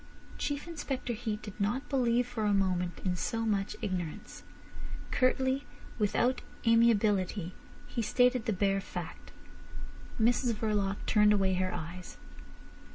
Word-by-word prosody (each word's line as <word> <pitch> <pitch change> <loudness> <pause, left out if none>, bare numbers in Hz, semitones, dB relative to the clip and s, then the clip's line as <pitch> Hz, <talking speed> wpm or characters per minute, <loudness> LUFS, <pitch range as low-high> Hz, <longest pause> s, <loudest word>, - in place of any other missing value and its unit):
Chief 290 +2 -2
Inspector 275 -7 -3
Heat 215 -2 -4
did 205 -1 -9
not 230 +7 0
believe 245 -3 +2
for 240 -3 -3
a 205 -1 +3
moment 180 -3 0
in 180 -1 +1
so 225 +5 -2
much 200 -2 0
ignorance. 180 -6 -4 0.7
Curtly, 260 +1 +1 0.3
without 235 +5 +2 0.2
amiability, 210 -5 +3 0.3
he 235 - -3
stated 245 +2 +3
the - - +1
bare 195 0 +1
fact. 175 -3 -7 0.9
Mrs 240 +1 +3
Verloc 205 -2 0
turned 210 -1 +5
away 195 -2 +2
her 185 0 0
eyes. 175 +2 -7
210 Hz, 125 wpm, -31 LUFS, 195-245 Hz, 0.9 s, turned